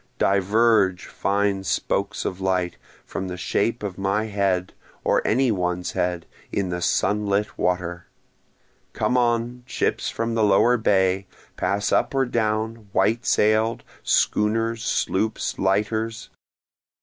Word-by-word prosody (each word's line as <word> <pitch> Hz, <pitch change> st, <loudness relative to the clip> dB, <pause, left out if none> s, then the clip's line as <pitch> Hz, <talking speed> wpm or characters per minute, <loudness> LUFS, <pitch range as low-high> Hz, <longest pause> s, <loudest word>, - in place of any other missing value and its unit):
Diverge, 100 Hz, -1 st, +3 dB
fine 100 Hz, -1 st, 0 dB
spokes -, -, -1 dB
of 95 Hz, +1 st, -3 dB
light, 90 Hz, -2 st, 0 dB, 0.3 s
from 95 Hz, -1 st, -4 dB
the 90 Hz, 0 st, -5 dB
shape 115 Hz, +5 st, -1 dB
of 100 Hz, -2 st, -5 dB
my 100 Hz, +3 st, 0 dB
head, 100 Hz, -4 st, 0 dB, 0.3 s
or -, -, +2 dB
any 125 Hz, +2 st, +3 dB
one's 90 Hz, -2 st, -1 dB
head, 90 Hz, -1 st, -1 dB, 0.3 s
in 100 Hz, -2 st, -1 dB
the 90 Hz, 0 st, -3 dB
sunlit 105 Hz, +3 st, 0 dB
water! 90 Hz, -1 st, -2 dB, 0.9 s
Come 125 Hz, -, 0 dB
on, 120 Hz, 0 st, +1 dB
ships -, -, -1 dB
from 115 Hz, 0 st, -2 dB
the 115 Hz, -1 st, +2 dB
lower 105 Hz, +4 st, +4 dB
bay! 95 Hz, -3 st, +2 dB, 0.3 s
pass 100 Hz, +1 st, -1 dB
up -, -, +1 dB
or 135 Hz, 0 st, +3 dB
down, 110 Hz, -2 st, -2 dB
white 115 Hz, +5 st, +1 dB
sail'd 110 Hz, +2 st, +2 dB, 0.2 s
schooners, 115 Hz, +2 st, +1 dB
sloops, 110 Hz, 0 st, -1 dB
lighters! 110 Hz, +3 st, -1 dB
100 Hz, 125 wpm, -23 LUFS, 95-115 Hz, 0.9 s, lower